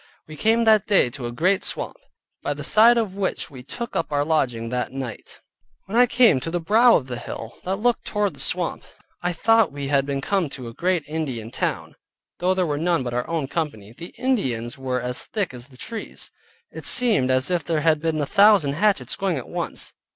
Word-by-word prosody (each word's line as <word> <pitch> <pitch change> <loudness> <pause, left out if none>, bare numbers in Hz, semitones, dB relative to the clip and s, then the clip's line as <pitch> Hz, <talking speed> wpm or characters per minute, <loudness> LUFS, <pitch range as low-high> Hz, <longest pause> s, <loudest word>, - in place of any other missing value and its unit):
We 155 - -9
came 225 +7 +2
that 215 -2 +4
day 195 - +4
to 130 -3 -6
a - - -5
great 185 +10 +1
swamp, - - -2 0.4
by - - -2
the - - -7
side 230 +3 +6
of 220 -5 -1
which 195 -4 -2
we 130 -3 -10
took 235 - -7
up 165 - -1
our 145 0 +1
lodging 125 -8 0
that 125 0 -2
night. 130 -4 -7 0.5
When 200 - -6
I 245 +1 +6
came 235 - +5
to 130 - -4
the 175 +1 -1
brow 225 +8 +5
of 130 - +1
the 125 -2 -5
hill, 115 0 -8
that 190 +1 0
looked 235 +4 0
toward 210 -2 -1
the - - -15
swamp, 180 -2 +1 0.4
I 180 - 0
thought 225 +4 +3
we 140 -1 -5
had 140 -1 +2
been 140 -1 -1
come 180 +2 0
to 130 -3 -8
a 115 - -8
great 175 +2 0
Indian 135 -8 -4
town - - -3 0.5
(though 185 +1 +1
there 185 -1 +1
were 145 -3 -2
none 170 -3 +1
but 120 -1 -4
our 125 0 -2
own 160 -5 -1
company). 125 -10 -4
The 170 +5 -10
Indians 135 - -1
were 130 -2 -2
as 125 0 -3
thick 200 - -2
as 125 0 -9
the 130 -2 -17
trees: 225 - -6 0.4
it - - -3
seemed 220 - +4
as 130 +4 +1
if 175 -3 0
there 160 0 -1
had 155 -1 +2
been 160 -1 -1
a 145 - 0
thousand 200 -5 +5
hatchets 205 +6 +1
going 190 -5 -1
at 130 - -6
once. - - -4
160 Hz, 220 wpm, -23 LUFS, 130-200 Hz, 0.5 s, side